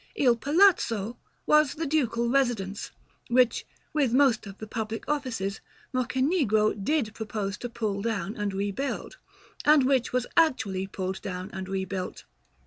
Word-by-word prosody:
"Il 255 - +4
Palazzo" 245 - +3 0.3
was 300 -2 +4
the 325 - -2
Ducal 250 -6 +1
residence, 235 -7 0 0.4
which, 245 0 +3 0.3
with 280 -6 +2
most 260 -6 +3
of 195 0 -9
the 220 - -7
public 220 0 -4
offices, 245 -10 -2 0.3
Mocenigo 255 - +2
did 220 +2 -1
propose 210 -3 -3
to 245 - -5
pull 215 -4 -2
down 215 -2 -2
and 205 -1 -2
rebuild, 200 +8 -3 0.5
and 295 -3 +6
which 265 -2 +2
was 250 -1 0
actually 220 - +2
pulled 190 -1 -4
down 185 0 -5
and 190 -1 -6
rebuilt. 190 -1 -4
230 Hz, 135 wpm, -27 LUFS, 200-270 Hz, 0.5 s, and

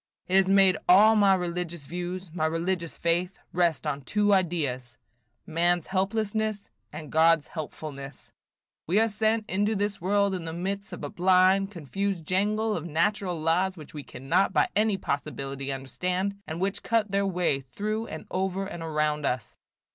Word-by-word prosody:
"It 185 - 0
has 195 -1 +5
made 195 -1 +5
all 210 +5 +7
my 200 -2 +5
religious 175 -3 -4
views, 180 +2 -5
my 160 -2 0
religious 170 +1 -2
faith, 175 +2 0 0.2
rest 170 -5 +1
on 140 - -2
two 205 +8 +2
ideas, 145 - -1 0.2
– 110 0 -48
man's 170 +1 +1
helplessness, 205 - -1 0.2
and 150 -1 -8
God's 160 -1 +4
helpfulness. 145 -3 -8 0.6
We 185 +6 +3
are 225 - +4
sent 220 0 0
into 205 +3 0
this 205 -1 -2
world 200 +2 +2
in 180 -3 -4
the 160 - -5
midst 195 +4 -4
of - - -8
a 145 - -3
blind, 185 +2 +4
confused 190 0 -3
jangle 210 +4 +1
of 160 - -3
natural 175 +2 0
laws, 180 +4 +1
which 155 - -11
we 150 - -6
cannot 155 +10 0
by - - +3
any 210 -1 +2
possibility 140 -3 -4
understand, 180 +9 -2
and 160 +1 -5
which 195 +2 -1
cut 225 -3 0
their 200 0 +1
way 180 -7 +1
through 215 - -4
and 160 - -7
over 190 +1 -1
and 175 -3 -7
around 150 -2 0
us. 125 -4 -3
180 Hz, 165 wpm, -27 LUFS, 160-200 Hz, 0.6 s, all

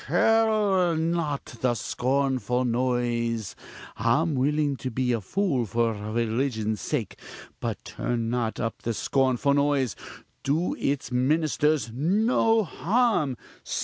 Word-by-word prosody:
curl 210 -6 +3
not 160 -3 -1 0.2
the 125 -2 +2
scornful 130 0 0
nose 120 -2 -1 0.4
I'm 120 +9 +2
willing 145 +2 +1
to 130 - -4
be 125 +1 0
a 115 - -1
fool 135 - 0
for 115 +2 +1
religion's 110 +1 -1
sake 130 -9 -3 0.4
but - - -4
turn 115 -2 -2
not 120 -2 -1
up 115 -1 -3
the 115 -1 -2
scornful 135 +4 +1
nose 140 -4 +1 0.5
do 155 +6 0
its 140 -2 -1
ministers 150 +1 +1
no 220 - +2
harm! 185 - +1
130 Hz, 115 wpm, -26 LUFS, 120-155 Hz, 0.5 s, curl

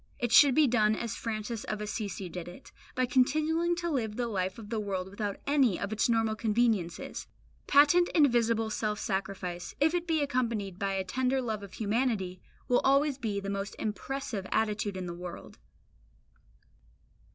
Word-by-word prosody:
It 240 -1 -2
should 275 +1 +7
be 310 - +6
done 215 -4 +3
as 235 -1 -4
Francis 220 0 -4
of 215 - -3
Assisi 210 -2 -4
did 175 0 -7
it, 175 - -12 0.2
by 255 - +2
continuing 310 +7 +2
to 345 0 -3
live 225 -7 -1
the 245 +1 -1
life 190 -4 -2
of 220 -1 -10
the 225 - 0
world 195 -3 -3
without 200 +1 -4
any 270 -9 +3
of 200 +2 -3
its 215 +2 +1
normal 225 -1 +2
conveniences. 215 -5 0 0.4
Patent 295 +5 +5
and 305 -4 +7
visible 230 -3 +1
self 210 -1 -1
sacrifice, 190 -3 -4
if 310 +3 +3
it 350 -1 -1
be 320 -3 +2
accompanied 230 -9 -2
by 195 -1 -1
a 190 0 -1
tender 255 +7 0
love 220 -5 -3
of 200 -2 -10
humanity, 210 -5 -1 0.3
will 245 - +3
always 275 0 +3
be 210 -5 -2
the 195 - -6
most 200 0 -4
impressive 220 -2 -4
attitude 210 -2 0
in 185 - -4
the 175 - -5
world. 175 - -9
220 Hz, 175 wpm, -30 LUFS, 200-255 Hz, 0.4 s, should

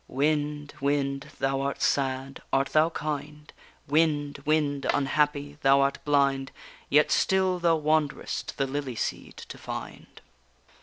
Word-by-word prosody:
_Wind, 150 +1 -1
wind! 140 0 -1
thou 135 0 0
art 140 0 -2
sad, 135 0 -1
art 135 +1 +2
thou 155 +1 +4
kind? 150 -1 -5 0.3
Wind, 145 -1 +1
wind, 145 -2 +1
unhappy! 145 +1 0
thou 135 -1 +5
art 140 0 0
blind, 140 -2 +2 0.4
Yet 150 +1 +4
still 190 -1 +2
thou 170 -1 +3
wanderest 155 -2 -1
the 135 - +1
lily 135 -2 -4
seed - - -4
to - - -10
find. - - -8
145 Hz, 130 wpm, -27 LUFS, 140-150 Hz, 0.4 s, thou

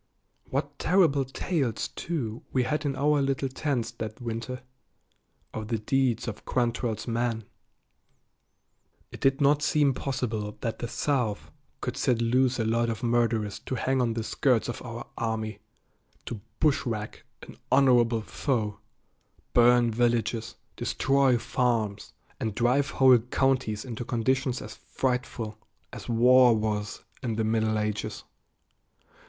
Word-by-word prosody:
What 140 +1 -3
terrible 160 -7 +3
tales, 135 -3 -2
too, 120 -10 -4
we 130 - +2
had 150 +3 -1
in 135 - -1
our 145 +2 +2
little 135 0 0
tents 130 -4 -2
that 110 -2 -6
winter, 120 +2 -5 0.9
of 110 -1 -5
the 115 0 0
deeds 125 +2 0
of 110 - -5
Quantrell's 120 -2 -1
men. 115 -1 -1 1.7
It - - -10
did 135 +1 +2
not 145 +1 +4
seem 145 -2 +3
possible 115 -6 -3
that 115 -2 -3
the 120 - -3
South 125 -5 -1 0.3
could - - -3
set 120 -2 +1
loose 125 +2 +2
a 115 - 0
lot 115 +1 +1
of 115 +1 -4
murderers 115 -4 +1
to 130 - -4
hang 130 0 +1
on 115 -2 +1
the 115 - -2
skirts 125 0 +1
of 120 - -5
our 120 -1 -7
army, 110 -1 -2 0.7
to 110 -4 -6 0.2
"bushwhack" 120 -8 0 0.2
an - - -12
honorable 120 -4 +4
foe, 110 -5 -2 0.7
burn 120 0 +5
villages, 115 -1 0 0.2
destroy 135 -2 +2
farms, 115 -4 -1 0.3
and 110 -2 -2
drive 125 +5 +2
whole 130 -2 +6
counties 125 -2 0
into 120 -1 -5
conditions 130 +2 0
as - - -8
frightful 125 -4 -3 0.3
as - - -8
war 125 +1 +6
was 105 -1 -2 0.2
in 120 -4 -2
the 110 - 0
Middle 110 0 +1
Ages. 105 -1 -3
120 Hz, 135 wpm, -27 LUFS, 110-130 Hz, 1.7 s, whole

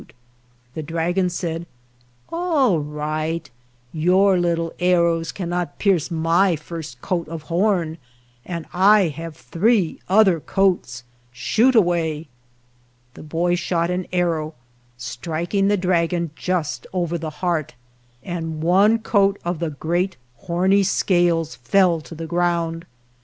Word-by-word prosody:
The 160 - -4
dragon 170 +4 0
said, 170 -1 -4 0.6
"All 315 - +2
right; 155 +2 -3 0.5
your 185 +4 +3
little 170 -1 0
arrows 170 -2 +2
cannot 175 -5 -3
pierce 185 -6 +1
my 165 +2 +2
first 155 -4 -8
coat 170 -3 -1
of 160 -1 -7
horn, 175 -4 +1 0.4
and 170 -3 -5
I 195 0 +5
have 165 +1 -7
three 195 0 +1
other 190 -3 +5
coats 175 -10 0 0.2
— 120 0 -36
shoot 220 - +2
away." 170 -6 +2 0.9
The - - -12
boy 165 +3 0
shot 175 0 0
an 180 0 -2
ar 180 -1 +2
row, 155 +1 -6 0.4
striking 170 +9 -2
the 205 0 +3
dragon 170 -2 0
just 155 -10 -2
over 175 -2 -1
the 160 -1 -4 0.2
heart, 160 -7 -1 0.5
and 165 -3 -4
one 195 +7 +4
coat 200 -3 +2
of 175 -2 -2
the 170 -2 -1
great 175 +6 -2 0.2
horny 185 +8 +2
scales 175 -4 +1
fell 170 +7 +2
to 165 - -11
f 160 - -9
e - - -3
ground. 170 0 -1
170 Hz, 130 wpm, -22 LUFS, 160-185 Hz, 0.9 s, I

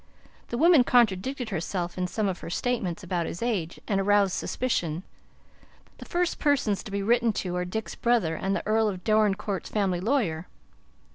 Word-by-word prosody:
The 235 - -4
woman 325 -2 +6
contradicted 240 +2 +2
herself 175 -1 -3
in 180 -1 -1
some 210 +3 -1
of 185 -2 -2
her - - -7
statements 205 -2 -2
about 175 -2 -2
his 175 - -5
age, 195 -9 -2
and 195 -2 +1
aroused 200 -1 +3
suspicion. 175 -9 -2 1.0
The - - -9
first 350 -1 -1
persons 260 - +1
to - - -7
be 200 0 -2
written 235 +2 +3
to 180 -3 -3
are 180 - -1
Dick's 220 +5 -4
brother 235 -9 +1
and 195 +4 -1
the - - -3
Earl 220 0 +2
of 185 -3 -6
Dorincourt's 210 -3 +1
family 195 -4 0
lawyer." 185 - 0
205 Hz, 170 wpm, -27 LUFS, 180-235 Hz, 1.0 s, woman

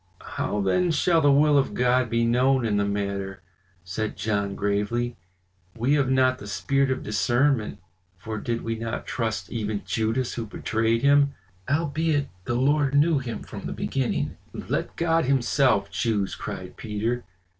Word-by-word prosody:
"How 140 -8 -1
then 175 - +2
shall 165 +1 +3
the 145 -1 +5
will 145 +1 +5
of 135 - -1
God 125 0 +2
be 115 +1 +1
known 125 +2 +3
in 105 -2 +1
the 100 - +2
matter?" 100 -1 -3 0.4
said 100 +5 -4
John 100 -1 -1
gravely. 105 +4 -1 0.6
"We 125 +5 +2
have 140 -3 +2
not 130 -1 +3
the 105 - -9
spirit 135 +6 +1
of 130 0 -1
discernment, 120 +3 +1 0.4
for 110 +2 -5
did 115 +2 -3
we 115 - -2
not 115 0 -4
trust 115 -3 -3
even 105 -3 -3
Judas 115 +3 -1
who 115 -2 -4
betrayed 115 +2 0
him? 140 0 +4 0.3
Albeit 150 0 0 0.2
the 120 - -1
Lord 140 +2 +2
knew 150 +1 +4
him 120 -3 -5
from - - -7
the - - -4
beginning." 135 -3 -2 0.2
"Let - - -3
God 165 -1 +2
himself 130 -6 +2
choose!" 100 +1 0
cried 95 -3 -7
Peter. 110 +3 -2
120 Hz, 155 wpm, -25 LUFS, 105-140 Hz, 0.6 s, the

